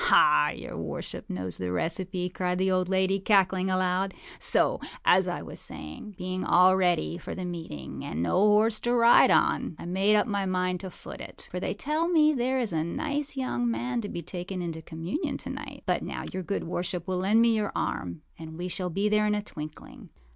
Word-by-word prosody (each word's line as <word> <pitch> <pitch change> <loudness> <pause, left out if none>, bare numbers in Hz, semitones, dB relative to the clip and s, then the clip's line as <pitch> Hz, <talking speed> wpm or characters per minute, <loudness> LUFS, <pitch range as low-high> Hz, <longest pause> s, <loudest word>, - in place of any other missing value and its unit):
âAh, 75 0 +5
your - - -7
worship - - -5
knows 90 0 -3
the 90 -1 -2
recipe,â 180 - -1
cried 180 -1 -1
the 190 +1 +1
old 185 -1 +1
lady, 190 +1 +2
cackling 190 -2 +3
aloud. 185 +1 0 0.2
âSo, - - +2 0.2
as - - +5
I - - -3
was - - -7
saying, 80 - -6
being 185 0 -3
all 185 +1 +5
ready 175 -2 +1
for - - -6
the 185 - -4
meeting, 165 - -6
and 80 +3 -3
no - - 0
horse 210 +2 +4
to 240 +1 +1
ride 235 0 +7
on, - - +2
I - - -8
made 195 +4 +2
up 210 - +3
my 200 -4 -1
mind 180 -1 0
to 190 - -6
foot - - -10
it; - - -11
for - - -3
they - - -2
tell 310 +3 -1
me 310 -3 +4
there 260 0 0
is 230 -8 -1
a 155 -1 +1
nice 290 - -3
young 250 -2 0
man 245 +1 -1
to 205 - -5
be 170 - -5
taken 180 +3 -5
into 165 -2 -4
communion 165 - -3
to - - -6
night. - - -8
But - - +1
now - - -5
your 185 - -2
good 200 +3 -2
worship 175 +1 -3
will 185 -1 -1
lend 200 +4 +3
me 230 -1 +4
your 210 -2 -1
arm, 85 -3 -3 0.2
and 160 0 -8
we 180 +1 -4
shall 180 +1 -2
be 195 +5 0
there 210 0 +3
in 210 - +2
a 210 - -2
twinkling. 155 -6 -9
185 Hz, 210 wpm, -28 LUFS, 175-210 Hz, 0.2 s, ride